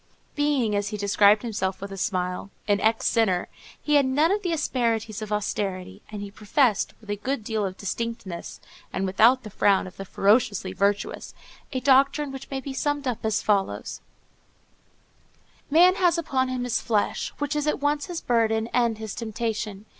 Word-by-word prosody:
Being, 285 -8 +1
as 205 0 0
he 210 0 -4
described 205 +1 +4
himself 195 -5 -2
with 200 0 -7
a - - -5
smile, 185 -1 -2 0.2
an 205 -1 +3
ex 225 +1 +1
sinner, 195 -6 +2 0.3
he 295 -1 +2
had 280 - +4
none 295 +6 +3
of 410 +1 +1
the 360 -4 -2
asperities 230 -8 -1
of 215 -1 -6
austerity, 195 -2 -3
and 210 -1 -6
he 200 - -8
professed, 215 +2 +1
with 215 -2 -8
a - - 0
good 255 +2 -3
deal 215 0 -1
of 190 -1 -3
distinctness, 205 -4 -5 0.3
and 195 - -2
without 230 +7 +4
the 215 - -9
frown 195 0 +3
of 185 - -11
the 195 - -6
ferociously 200 -1 +2
virtuous, 200 +2 -1 0.4
a 260 - -2
doctrine 275 +2 +3
which 270 0 -8
may 270 - -3
be 270 0 -6
summed 290 +1 -1
up 245 -3 -3
as 220 0 0
follows:— 200 -2 -1 1.7
"Man 350 +5 +6
has 355 -2 +2
upon 265 -5 0
him 255 -1 -2
his 245 -2 -1
flesh, 215 -3 0
which 290 +1 -2
is 295 0 -1
at 300 - +1
once 290 0 0
his 350 -2 -5
burden 225 -1 +1
and 235 -3 +2
his 220 -2 -6
temptation. 220 -2 -4
220 Hz, 180 wpm, -25 LUFS, 205-270 Hz, 1.7 s, Man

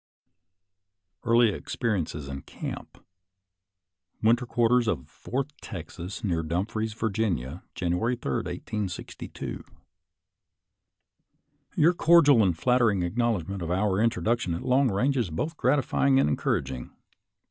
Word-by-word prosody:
eaelt 115 -2 +4
experiences 90 - -3
in 70 0 -6
camp - - -8 1.2
Winter 120 +3 +3
Quarters 120 0 +2
op 70 -10 -1
Fourth 140 +4 -4
Texas, 90 +1 -7
Near 85 -5 0
Dumfries, 100 +7 -2
Va., 110 -1 -1 0.6
January 90 +8 0
3, 115 - -4
1862. 105 -5 -5 2.1
Your 170 +4 +5
cordial 155 -7 +6
and 90 -5 +2
flattering 120 -4 +2
acknowledgment 100 -2 -1
of 85 - -3
our 95 +2 +1
introduction 115 -5 +1
at - - -6
long 130 +1 +3
range 125 +8 +1
is 115 -8 0
both 150 - -3
gratify 140 0 +1
ing 135 -1 +5
and - - +3
encouraging. 65 -3 -1
110 Hz, 110 wpm, -27 LUFS, 90-125 Hz, 2.1 s, cordial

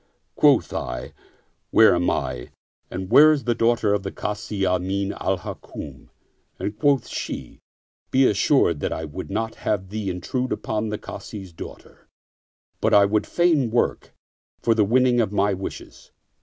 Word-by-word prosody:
Quoth - - +4
I, - - -5 0.3
" - - -45
Where 110 - +6
am 90 0 +1
I 65 -4 -3 0.4
and 95 0 -6
where 155 +2 +8
is 150 -3 0
the 120 - +1
daughter 115 -2 +2
of 105 - 0
the 95 - -5
Kazi 105 -1 -3
Amin 95 +2 0
al 95 - -1
Hukm - - -9 0.2
?" - - -45
and 105 +1 -4
quoth 140 -2 +2
she, - - -6 0.3
" - - -58
Be 135 +1 +4
assured 100 - +3
that - - -2
I 80 - -3
would 80 +5 -7
not 110 +3 -2
have 95 -3 -1
thee 105 -1 -3
intrude 125 +8 -3
upon 110 0 -2
the 105 - -3
Kazi's 95 -5 -9
daughter, - - -11 0.7
but - - +3
I 100 -1 +7
would 105 +1 0
fain 165 -8 +2
work 120 +2 -1 0.4
for 115 - +2
the 110 -1 +3
winning 120 +3 +3
of 105 - -1
my 100 0 +2
wishes. 95 0 -8
105 Hz, 170 wpm, -23 LUFS, 95-120 Hz, 0.7 s, where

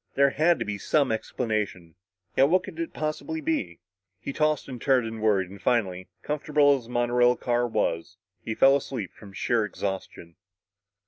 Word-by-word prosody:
There 140 0 +4
had 165 +4 +3
to 115 - -3
be 105 -1 -4
some 145 +5 +2
explanation. 105 -7 -3 0.4
Yet 135 +2 +5
what 185 +2 +3
could 170 -4 -9
it 165 - -3
possibly 155 +1 -3
be? 140 - -2 0.4
He 140 - -5
tossed 155 0 +1
and 125 -3 -8
turned 130 -4 +3
and 110 -1 -6
worried 100 -4 +2
and 100 - -11
finally 95 -7 0 0.2
comfortable 150 -1 +3
as 130 -4 -6
the - - -15
monorail 120 0 +3
car 120 0 0
was 85 -5 -2 0.3
he 110 - -3
fell 135 +3 +6
asleep 130 -8 -4
from 100 - -13
sheer 115 +4 0
exhaustion. 95 -4 -5
120 Hz, 175 wpm, -26 LUFS, 100-140 Hz, 0.4 s, fell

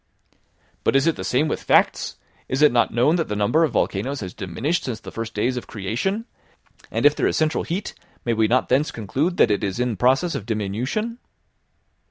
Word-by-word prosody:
"But - - +2
is 135 +1 +4
it 165 - +2
the - - -6
same 140 +5 +1
with - - -2
facts! - - +2 0.3
Is 135 +3 +1
it 150 - +7
not 120 -1 +2
known 135 +9 +3
that 165 - -1
the 105 - -3
number 105 +11 +2
of 160 - 0
volcanoes 130 +8 -1
has 95 -3 -6
diminished 125 - -2
since 115 -4 -4
the - - -10
first 115 0 -6
days 125 +4 0
of 120 - -6
creation? 120 - -2 0.6
and - - -1
if 145 0 +6
there - - +1
is - - 0
central 155 0 +1
heat 190 +5 -4 0.3
may 120 - +1
we 110 -1 +2
not 125 +3 +2
thence 140 +5 +2
conclude 140 - -2
that 110 - +5
it 105 - 0
is 100 +2 -2
in 125 -2 0
process 135 - +2
of 125 -8 -5
diminution?" 120 - -2
125 Hz, 210 wpm, -23 LUFS, 110-155 Hz, 0.6 s, it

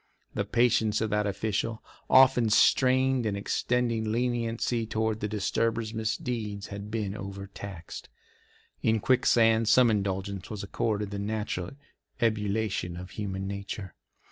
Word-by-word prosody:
The - - -1
patience 115 -3 +2
of 110 0 -1
that 105 0 +1
official, 110 +2 -2 0.3
often 130 -3 +6
strained 130 +2 +4
in 100 - -1
extending 115 +2 0
leniency 115 -1 -1
toward 110 -1 -1
the 105 - -2
disturber's 110 +2 -1
misdeeds, 110 -1 -3
had 100 +1 -7
been 105 -3 -2
overtaxed. 100 -3 -8 0.7
In 110 0 +2
Quicksand 115 -2 +3
some 125 0 +6
indulgence 100 -2 -2
was 105 -2 -5
accorded 105 0 -2
the 100 - -4
natural 105 -4 -3 0.5
ebullition 105 -5 0
of 90 +1 -8
human 95 -2 -4
nature. 100 -1 -6
110 Hz, 120 wpm, -28 LUFS, 100-115 Hz, 0.7 s, often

